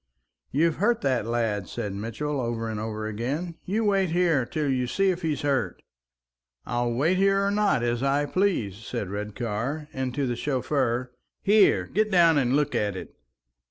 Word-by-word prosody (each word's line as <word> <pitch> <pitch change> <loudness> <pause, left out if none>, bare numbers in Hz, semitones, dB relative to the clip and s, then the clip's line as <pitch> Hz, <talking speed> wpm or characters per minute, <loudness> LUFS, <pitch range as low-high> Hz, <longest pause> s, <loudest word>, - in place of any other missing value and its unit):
"You've 160 +3 +2
hurt 225 +5 +2
that 130 -5 0
lad," 115 -4 -1
said 100 - -4
Mitchell, 115 +8 -3
over 115 -1 -2
and 110 -1 -3
over 110 0 -4
again. 140 +11 -3
"You'll 215 +4 0
wait 195 -2 +2
here 165 -7 +2
till 155 -3 -2
you 130 -2 0
see 195 +8 +2
if 180 0 -4
he's 155 -2 -1
hurt." 140 -2 -1 0.8
"I'll 120 0 -1
wait 155 +10 +2
here 195 +1 +3
or 200 - +1
not 205 - +2
as 120 0 0
I 140 +2 +2
please," 145 - 0
said 100 -3 -5
Redcar; 115 +8 -3
and 130 -2 -2
to 140 - 0
the 120 -1 -1
chauffeur, 125 -2 -1 0.3
"Here! 205 0 +4
get 215 +1 0
down 170 -5 +5
and 125 0 +1
look 150 -1 +1
at 105 -2 0
it!" 95 - -8
135 Hz, 175 wpm, -26 LUFS, 115-170 Hz, 0.8 s, down